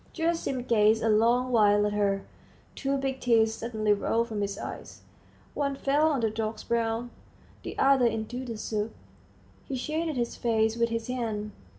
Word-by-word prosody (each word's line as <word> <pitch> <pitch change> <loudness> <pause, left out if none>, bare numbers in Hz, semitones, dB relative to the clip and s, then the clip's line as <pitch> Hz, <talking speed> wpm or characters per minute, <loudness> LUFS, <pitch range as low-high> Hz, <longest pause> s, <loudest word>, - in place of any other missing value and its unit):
Gerasim 325 -6 -1
gazed 220 -1 +4
a 225 - +2
long 235 +4 +3
while 205 -3 +4
at 210 - -1
her; 200 -1 +1 0.5
two 275 0 -1
big 270 -1 -2
tears 225 -2 +3
suddenly 220 -2 0
rolled 230 +3 0
from 215 -2 -3
his 200 0 -2
eyes; - - -8 0.5
one 280 -1 -1
fell 285 +3 +2
on 285 -5 +1
the 220 -1 +1
dog's 220 0 -3
brow, 230 0 -1 0.5
the - - -7
other 270 -3 +4
into 230 +3 -3
the 230 -3 -5
soup. 215 0 -3 0.7
He 270 - -3
shaded 310 +4 -2
his 235 -1 -1
face 220 -1 +1
with 235 0 +1
his 230 0 -2
hand. 225 -4 -3
230 Hz, 170 wpm, -28 LUFS, 215-255 Hz, 0.7 s, gazed